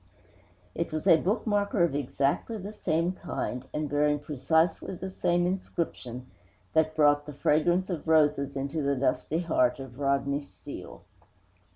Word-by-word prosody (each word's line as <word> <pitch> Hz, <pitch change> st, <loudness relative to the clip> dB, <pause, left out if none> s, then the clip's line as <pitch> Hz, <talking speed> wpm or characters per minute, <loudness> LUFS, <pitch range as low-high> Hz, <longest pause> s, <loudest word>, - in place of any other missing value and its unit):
It -, -, -3 dB
was 155 Hz, 0 st, -3 dB
a -, -, +8 dB
bookmarker 205 Hz, -1 st, +1 dB
of 165 Hz, -, -3 dB
exactly 140 Hz, -, -1 dB
the 205 Hz, +1 st, -7 dB
same 170 Hz, -3 st, 0 dB
kind, 135 Hz, -8 st, -4 dB
and 150 Hz, 0 st, -2 dB
bearing 145 Hz, +1 st, +2 dB
precisely 160 Hz, +5 st, 0 dB
the 190 Hz, +2 st, -6 dB
same 175 Hz, -1 st, +1 dB
inscription, 165 Hz, -9 st, -3 dB, 0.5 s
that 155 Hz, 0 st, +2 dB
brought 145 Hz, -1 st, +4 dB
the 150 Hz, -, -6 dB
fragrance 175 Hz, +6 st, +2 dB
of 165 Hz, -2 st, -4 dB
roses 150 Hz, -3 st, +3 dB
into 140 Hz, +3 st, -2 dB
the 140 Hz, 0 st, +1 dB
dusty 130 Hz, +5 st, 0 dB
heart 125 Hz, -7 st, +2 dB
of 135 Hz, -1 st, -9 dB
Rodney 140 Hz, 0 st, +1 dB
Steele. 140 Hz, -, -10 dB
150 Hz, 145 wpm, -28 LUFS, 140-175 Hz, 0.5 s, a